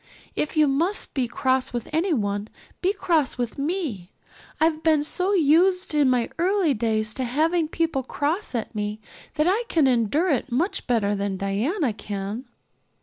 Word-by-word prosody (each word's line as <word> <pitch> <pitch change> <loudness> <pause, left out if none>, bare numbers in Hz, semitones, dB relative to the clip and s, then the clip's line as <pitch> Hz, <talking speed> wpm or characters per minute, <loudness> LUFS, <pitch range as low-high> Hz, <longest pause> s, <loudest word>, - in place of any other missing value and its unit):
If 305 - -2
you 305 -1 +5
must 330 +9 0
be 260 -3 0
cross 260 +2 0
with 240 -2 -3
anyone, 215 - 0 0.3
be 370 - +2
cross 345 -10 0
with 245 +2 -3
me. 280 - -3 0.5
I've 315 0 +2
been 315 -2 +3
so 365 +6 0
used 360 +3 +3
in 290 -3 +4
my 245 -2 +1
early 365 -3 +2
days 215 -2 -1
to 260 - -3
having 315 +6 +1
people 325 -3 -1
cross 295 - -2
at 230 - -3
me 210 0 -3 0.4
that 305 0 +2
I 400 +6 +3
can 320 -9 +2
endure 260 - +2
it 265 -1 -1
much 320 - -1
better 220 -5 +2
than 200 -1 -2
Diana 225 - 0
can." 205 +3 -5
280 Hz, 160 wpm, -24 LUFS, 230-330 Hz, 0.5 s, you